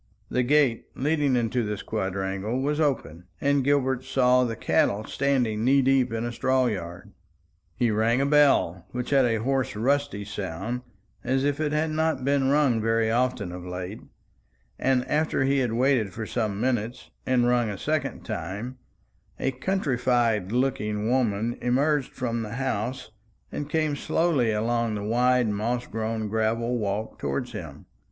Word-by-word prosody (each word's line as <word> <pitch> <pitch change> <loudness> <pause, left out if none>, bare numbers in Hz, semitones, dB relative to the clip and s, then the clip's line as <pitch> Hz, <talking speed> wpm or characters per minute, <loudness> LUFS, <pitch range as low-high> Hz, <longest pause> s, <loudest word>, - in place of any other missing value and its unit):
The 125 - +2
gate 130 -2 +2
leading 145 -1 +1
into 120 0 0
this 105 -1 -4
quadrangle 95 +2 -2
was 145 +3 0
open, 90 - -1
and 140 -1 +2
Gilbert 130 -2 +1
saw 125 -1 +3
the 115 -2 -2
cattle 105 -1 +1
standing 125 -4 0
knee 135 +2 +4
deep 135 -2 +3
in 115 +1 -2
a 120 - -2
straw 130 +2 +1
yard. 90 -6 -4 0.6
He 120 +2 +1
rang 110 +3 +2
a 140 - +2
bell, 140 - +3
which 125 +2 -4
had 135 -2 +5
a 115 -2 +2
hoarse 130 -1 0
rusty 135 -2 0
sound, 100 +6 -4 0.4
as 130 +1 +1
if 145 0 0
it 155 -1 0
had 155 +1 0
not 155 -4 0
been 140 -1 +2
rung 140 -6 +3
very 115 0 +1
often 120 -5 0
of 90 0 -7
late; 90 +3 -6 0.8
and 130 -1 +1
after 155 -2 +1
he 135 +1 +2
had 125 -4 0
waited 120 -5 +2
for 110 +2 -5
some 105 -3 -2
minutes, 120 0 -2 0.2
and 125 -2 +3
rung 120 -2 +2
a 100 - -4
second 155 +8 -2
time, 110 +10 -5 0.6
a 135 - 0
countrified 125 - 0
looking 115 -4 0
woman 115 -2 0
emerged 140 +3 +1
from 115 -3 -2
the 110 0 -5
house, 125 -1 -3 0.4
and 145 0 -4
came 155 -2 0
slowly 145 -6 +1
along 115 +1 0
the 105 - -4
wide 125 +2 +2
moss 115 +4 -1
grown 110 0 -3
gravel 115 +3 0
walk 105 +1 -3
towards 125 -2 -2
him. 85 - -8
125 Hz, 160 wpm, -26 LUFS, 110-135 Hz, 0.8 s, had